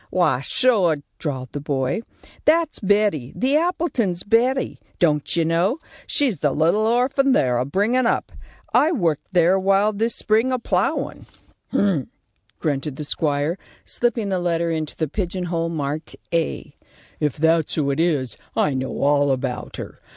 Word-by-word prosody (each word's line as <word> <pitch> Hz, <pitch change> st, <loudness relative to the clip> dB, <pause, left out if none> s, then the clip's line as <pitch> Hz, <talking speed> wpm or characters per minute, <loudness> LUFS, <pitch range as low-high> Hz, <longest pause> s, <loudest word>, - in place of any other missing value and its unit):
"Wy, -, -, +2 dB
sure!" 185 Hz, -, +2 dB, 0.2 s
drawled 130 Hz, -5 st, -4 dB
the 145 Hz, -, -4 dB
boy. 135 Hz, -, -1 dB, 0.4 s
"That's 320 Hz, 0 st, +2 dB
Betty. 200 Hz, -, +1 dB
The 265 Hz, +3 st, +1 dB
Appletons' 310 Hz, -, 0 dB
Betty. 245 Hz, +5 st, +1 dB, 0.2 s
Don't 150 Hz, -4 st, +1 dB
you 165 Hz, -1 st, +2 dB
know? 170 Hz, -, +1 dB, 0.3 s
She's 265 Hz, -, +1 dB
that 145 Hz, -3 st, +1 dB
little 175 Hz, +8 st, +3 dB
orphan 265 Hz, +3 st, +2 dB
they're 125 Hz, -, +2 dB
a 125 Hz, -, 0 dB
bringin' 220 Hz, -, +1 dB
up. -, -, 0 dB, 0.4 s
I 310 Hz, -, +4 dB
worked 170 Hz, -, 0 dB
there 175 Hz, -1 st, +4 dB
a 195 Hz, -, +2 dB
while 195 Hz, +2 st, +3 dB
this 225 Hz, +3 st, -1 dB
spring, 220 Hz, +4 st, +2 dB
a 255 Hz, -, +1 dB
plowin'." 240 Hz, -, -1 dB, 0.4 s
"Hump!" 185 Hz, -10 st, +1 dB, 0.5 s
grunted 145 Hz, -1 st, -2 dB
the 150 Hz, -, -5 dB
squire, 145 Hz, +3 st, 0 dB, 0.3 s
slipping 235 Hz, -4 st, 0 dB
the 190 Hz, -1 st, 0 dB
letter 170 Hz, -1 st, 0 dB
into 155 Hz, -2 st, -3 dB
the 160 Hz, -, -1 dB
pigeon 185 Hz, +3 st, -3 dB
hole 165 Hz, -1 st, -1 dB
marked 150 Hz, -1 st, -4 dB, 0.2 s
"A." 165 Hz, -1 st, -2 dB, 0.4 s
"If 150 Hz, -3 st, -1 dB
that's 160 Hz, 0 st, +2 dB
who 140 Hz, -3 st, +1 dB
it 140 Hz, -, -2 dB
is, 145 Hz, -9 st, 0 dB, 0.2 s
I 150 Hz, -, +2 dB
know 130 Hz, 0 st, -3 dB
all 145 Hz, 0 st, +3 dB
about 130 Hz, -1 st, -3 dB
her. -, -, -8 dB
170 Hz, 160 wpm, -22 LUFS, 145-220 Hz, 0.5 s, I